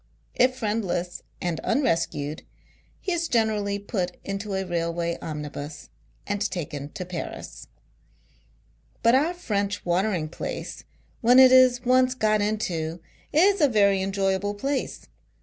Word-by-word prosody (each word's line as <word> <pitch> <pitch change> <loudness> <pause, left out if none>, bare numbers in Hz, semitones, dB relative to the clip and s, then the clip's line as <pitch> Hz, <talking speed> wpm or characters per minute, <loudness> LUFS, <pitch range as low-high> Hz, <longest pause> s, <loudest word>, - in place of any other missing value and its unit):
If 255 0 +3
friendless 205 -7 -2 0.2
and 175 -3 -2
uurescued, 165 - 0 0.6
he 380 - -2
is 340 -1 0
generally 215 -4 +1
put 195 -3 -3
into 195 0 -4
a 190 0 -1
railway 170 -1 -1
omnibus 150 -1 -6 0.4
and 205 -1 -2
taken 145 -5 -5
to 180 - -5
Paris. 175 -2 -7 1.4
But, 230 +1 +5
our 305 +7 +3
French 205 - -2
watering 175 -2 0
place 155 - -6 0.4
when 245 +2 +5
it 260 -1 +9
is, 255 -1 +5
once 255 +1 +4
got 215 -3 +2
into, 175 -6 -2 0.3
is 385 +5 +4
a 295 - +6
very 200 -5 +3
enjoyable 195 +1 0
place. 270 +6 -3
It - - -18
VOL. - - -33
200 Hz, 130 wpm, -25 LUFS, 175-245 Hz, 1.4 s, it